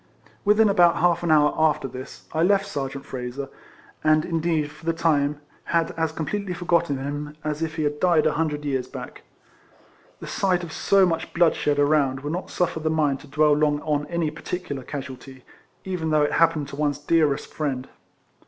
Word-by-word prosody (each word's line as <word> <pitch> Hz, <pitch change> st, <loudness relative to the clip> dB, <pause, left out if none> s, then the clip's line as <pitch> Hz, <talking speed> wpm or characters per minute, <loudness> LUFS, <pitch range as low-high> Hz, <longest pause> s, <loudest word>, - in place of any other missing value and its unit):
Within 210 Hz, +1 st, +5 dB
about 175 Hz, -4 st, +5 dB
half 175 Hz, -1 st, +2 dB
an 170 Hz, -, -2 dB
hour 150 Hz, -1 st, +5 dB
after 155 Hz, -3 st, +2 dB
this 130 Hz, +1 st, -10 dB
I 160 Hz, -, 0 dB
left 195 Hz, +3 st, +3 dB
Sergeant 140 Hz, -6 st, -5 dB
Frazer, 130 Hz, +1 st, -5 dB, 0.5 s
and, 155 Hz, 0 st, +4 dB
indeed, 165 Hz, -3 st, 0 dB
for 150 Hz, +2 st, -17 dB
the 165 Hz, 0 st, 0 dB
time, 150 Hz, -3 st, +1 dB, 0.3 s
had 165 Hz, -1 st, +1 dB
as 160 Hz, -1 st, -1 dB
completely 180 Hz, +4 st, -3 dB
forgotten 170 Hz, -4 st, +1 dB
him, 145 Hz, +2 st, -5 dB
as 150 Hz, 0 st, -3 dB
if 160 Hz, -1 st, -2 dB
he 155 Hz, -, -1 dB
had 150 Hz, 0 st, -1 dB
died 170 Hz, -4 st, +3 dB
a 155 Hz, -, +4 dB
hundred 150 Hz, -1 st, -2 dB
years 130 Hz, -3 st, -1 dB
back. 130 Hz, -2 st, -9 dB, 1.0 s
The -, -, -8 dB
sight 180 Hz, -2 st, 0 dB
of 165 Hz, -2 st, -7 dB
so 195 Hz, -1 st, +4 dB
much 165 Hz, -2 st, -2 dB
bloodshed 160 Hz, -4 st, +2 dB
around, 145 Hz, -2 st, +2 dB
will 145 Hz, +1 st, -4 dB
not 180 Hz, +3 st, -3 dB
suiFer 175 Hz, -2 st, -1 dB
the 155 Hz, -, 0 dB
mind 150 Hz, -4 st, +1 dB
to -, -, -14 dB
dwell 150 Hz, +1 st, +3 dB
long 145 Hz, 0 st, +2 dB
on 150 Hz, -1 st, -1 dB
any 170 Hz, -3 st, -1 dB
particular 165 Hz, -3 st, -5 dB
casuality, 130 Hz, -1 st, -8 dB, 0.4 s
even 180 Hz, -4 st, -2 dB
though 155 Hz, -1 st, +3 dB
it 145 Hz, -, +1 dB
happen 160 Hz, -3 st, +3 dB
to 140 Hz, -, -9 dB
one's 145 Hz, -1 st, 0 dB
dearest 150 Hz, -1 st, +1 dB
friend. 135 Hz, -4 st, -2 dB
155 Hz, 185 wpm, -24 LUFS, 145-165 Hz, 1.0 s, Within